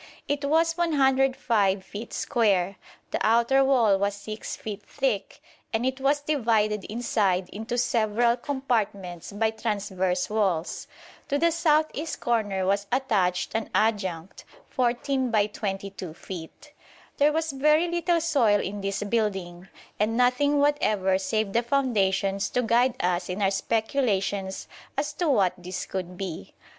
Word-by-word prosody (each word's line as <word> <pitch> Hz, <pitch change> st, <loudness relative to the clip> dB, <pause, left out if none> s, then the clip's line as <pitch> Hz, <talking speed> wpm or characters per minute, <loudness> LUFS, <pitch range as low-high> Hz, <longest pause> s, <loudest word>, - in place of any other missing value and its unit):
It 285 Hz, 0 st, -1 dB
was 325 Hz, +3 st, +2 dB
105 265 Hz, -, +2 dB
feet 210 Hz, +4 st, -8 dB
square; 200 Hz, -7 st, +1 dB, 0.3 s
the -, -, -1 dB
outer 235 Hz, +5 st, +4 dB
wall 235 Hz, -8 st, +3 dB
was 200 Hz, 0 st, 0 dB
6 215 Hz, +2 st, -6 dB
feet 210 Hz, -1 st, -7 dB
thick, 235 Hz, -5 st, -3 dB, 0.3 s
and 225 Hz, +2 st, 0 dB
it 260 Hz, +1 st, -2 dB
was 285 Hz, +2 st, +2 dB
divided 220 Hz, -8 st, +1 dB
inside 200 Hz, -5 st, 0 dB
into 225 Hz, +3 st, -4 dB
several 235 Hz, -1 st, +2 dB
compartments 220 Hz, -, -2 dB
by 220 Hz, +2 st, 0 dB
transverse 195 Hz, -5 st, -1 dB
walls. 195 Hz, -6 st, -1 dB, 0.4 s
To 285 Hz, -, 0 dB
the 335 Hz, +3 st, +3 dB
south 310 Hz, -2 st, +2 dB
east 315 Hz, +3 st, -4 dB
corner 205 Hz, -5 st, 0 dB
was 200 Hz, +1 st, 0 dB
attached 205 Hz, -9 st, +1 dB
an 225 Hz, -1 st, -2 dB
adjunct, 190 Hz, -6 st, -1 dB, 0.3 s
14 255 Hz, +1 st, 0 dB
by 215 Hz, -3 st, +3 dB
22 195 Hz, -4 st, -5 dB
feet. 190 Hz, -, -10 dB, 0.4 s
There 290 Hz, +1 st, +4 dB
was 320 Hz, 0 st, -1 dB
very 300 Hz, +5 st, +3 dB
little 345 Hz, 0 st, +1 dB
soil 260 Hz, -11 st, +3 dB
in 200 Hz, +1 st, -4 dB
this 195 Hz, +1 st, -2 dB
building; 195 Hz, -5 st, -2 dB, 0.3 s
and 220 Hz, +2 st, +1 dB
nothing 250 Hz, +4 st, +3 dB
whatever 215 Hz, -10 st, +2 dB
save 215 Hz, +1 st, -1 dB
the 235 Hz, -, +3 dB
foundations 200 Hz, -7 st, +1 dB
to 250 Hz, -, 0 dB
guide 240 Hz, +2 st, +3 dB
us 180 Hz, 0 st, 0 dB
in 180 Hz, +2 st, -3 dB
our 195 Hz, -1 st, +2 dB
speculations 200 Hz, -3 st, -1 dB, 0.3 s
as 290 Hz, +1 st, -1 dB
to 335 Hz, +1 st, -1 dB
what 200 Hz, -9 st, +3 dB
this 180 Hz, +1 st, -5 dB
could 180 Hz, -1 st, -5 dB
be. 185 Hz, -4 st, -6 dB
220 Hz, 140 wpm, -26 LUFS, 195-270 Hz, 0.4 s, outer